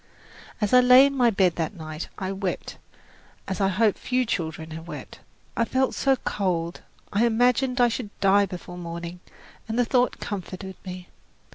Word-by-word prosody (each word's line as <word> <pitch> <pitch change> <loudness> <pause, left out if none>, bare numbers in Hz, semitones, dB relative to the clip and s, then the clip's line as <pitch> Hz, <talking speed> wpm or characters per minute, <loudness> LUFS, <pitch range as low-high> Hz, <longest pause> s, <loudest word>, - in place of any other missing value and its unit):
As 210 -1 0
I 250 - +9
lay 250 +2 +8
in 280 0 0
my 245 -3 +4
bed 190 -5 +2
that 165 +4 -2
night, 155 -1 -7
I 190 0 -3
wept 195 -1 -4 0.7
as 195 +1 -3
I 195 - +4
hope 205 +2 +2
few 255 0 0
children 160 -6 -3
have 160 +1 -8
wept. - - -8 0.4
I 230 - +2
felt 260 +3 +1
so 270 -1 +2
cold, 175 -7 -2 0.3
I 205 +3 +3
imagined 250 +2 +2
I 245 - +6
should 230 -2 -3
die 200 +1 +4
before 180 -1 -8
morning, 170 +1 -6 0.5
and 225 +1 -3
the 245 - +3
thought 250 +1 +1
comforted 190 -1 -6
me. 180 -1 -8
200 Hz, 170 wpm, -25 LUFS, 180-245 Hz, 0.7 s, I